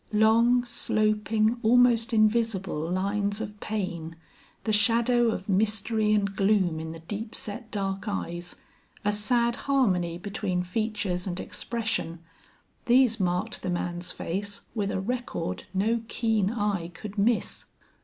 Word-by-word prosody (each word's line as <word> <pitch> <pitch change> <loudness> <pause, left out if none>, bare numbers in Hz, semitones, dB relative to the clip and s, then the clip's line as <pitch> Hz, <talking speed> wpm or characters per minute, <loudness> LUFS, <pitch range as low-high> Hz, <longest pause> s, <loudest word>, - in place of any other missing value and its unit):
Long, 230 +3 +4
sloping, 215 -1 +1
almost 235 0 +4
invisible 215 -7 +1
lines 200 +2 0
of 210 -1 -6
pain, 175 -7 -4 0.5
the 215 - 0
shadow 235 +3 +4
of 195 -4 -2
mystery 215 +2 +1
and 200 -2 +1
gloom 195 -5 +2
in 160 0 -5
the 165 0 -9
deep 210 +6 -6
set, 215 +2 -5
dark 195 -1 -3
eyes, 175 -3 -4 0.5
a 205 - +3
sad 235 +3 +2
harmony 185 -11 +2
between 195 -1 -2
features 205 -1 -2
and 180 0 -3
expression, 225 -8 -3 0.7
these 245 -2 +5
marked 180 -1 -1
the 185 - -3
man's 175 0 -3
face 200 +4 -4
with 205 -3 -1
a 190 - -1
record 210 - -3
no 220 +5 +1
keen 220 -5 +1
eye 205 -6 -1
could 200 +4 -8
miss. 225 +3 +1
210 Hz, 130 wpm, -27 LUFS, 185-225 Hz, 0.7 s, these